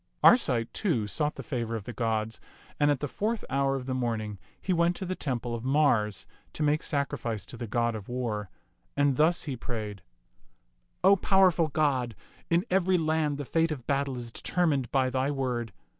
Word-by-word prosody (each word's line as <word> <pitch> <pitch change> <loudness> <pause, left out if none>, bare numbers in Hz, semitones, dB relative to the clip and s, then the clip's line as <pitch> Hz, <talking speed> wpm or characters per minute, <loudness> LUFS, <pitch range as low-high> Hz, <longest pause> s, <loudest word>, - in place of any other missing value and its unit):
Arcite, 125 - +5
too, 150 - 0
sought 150 +8 -1
the - - -7
favor 115 -4 -3
of 110 - -4
the 120 - -7
gods, 110 -1 -1 0.4
and 145 - +4
at 145 -2 +1
the 145 - -1
fourth 215 - -2
hour 135 0 +2
of 130 -2 -4
the 130 - -2
morning 110 -5 -2 0.2
he 185 - -1
went 170 +1 +2
to 190 - -4
the 185 - -2
temple 125 -8 -3
of 115 -1 -4
Mars 130 -7 +2 0.3
to 155 - -2
make 150 +1 +2
sacrifice 120 - -2
to - - -8
the 120 0 -5
god 115 +2 +1
of 105 -1 -7
war; 115 -5 -3 0.5
and 145 -1 +3
thus 160 +5 +3
he 140 -4 -3
prayed, 110 -5 -5 0.5
" - - -44
O 200 - +7
powerful 185 -4 +4
god, 135 -6 0 0.3
in 170 +4 +2
every 185 0 +3
land 155 -3 +1
the 145 - -4
fate 165 +4 +1
of 130 -6 -5
battle 140 -2 0
is 120 -1 -6
determined 145 -4 0
by 130 -2 +1
thy 130 +2 0
word. 125 -5 -2
135 Hz, 190 wpm, -28 LUFS, 115-155 Hz, 0.5 s, O